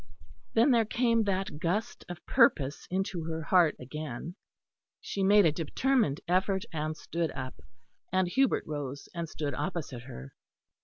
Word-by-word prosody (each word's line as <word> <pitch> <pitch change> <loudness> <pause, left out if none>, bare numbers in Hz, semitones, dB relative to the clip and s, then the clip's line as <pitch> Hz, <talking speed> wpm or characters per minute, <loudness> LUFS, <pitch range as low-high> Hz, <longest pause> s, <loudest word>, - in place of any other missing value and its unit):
Then 235 +5 +5
there 235 -2 +5
came 230 0 +2
that 190 -5 -2
gust 185 +6 -2
of 175 -1 -8
purpose 195 - +3
into 185 -2 -2
her 160 0 -3
heart 170 -1 +4
again; 150 +3 -6 0.7
she 200 - -4
made 200 +1 +6
a 160 - +5
determined 170 - +1
effort 190 +2 +1
and 155 0 -2
stood 165 +1 -2
up; 130 -1 -6 0.5
and 185 -1 +2
Hubert 265 +8 +2
rose 145 -2 -5
and 170 -2 -4
stood 145 -3 -3
opposite 155 -6 -4
her. 70 - -10
170 Hz, 145 wpm, -30 LUFS, 150-200 Hz, 0.7 s, made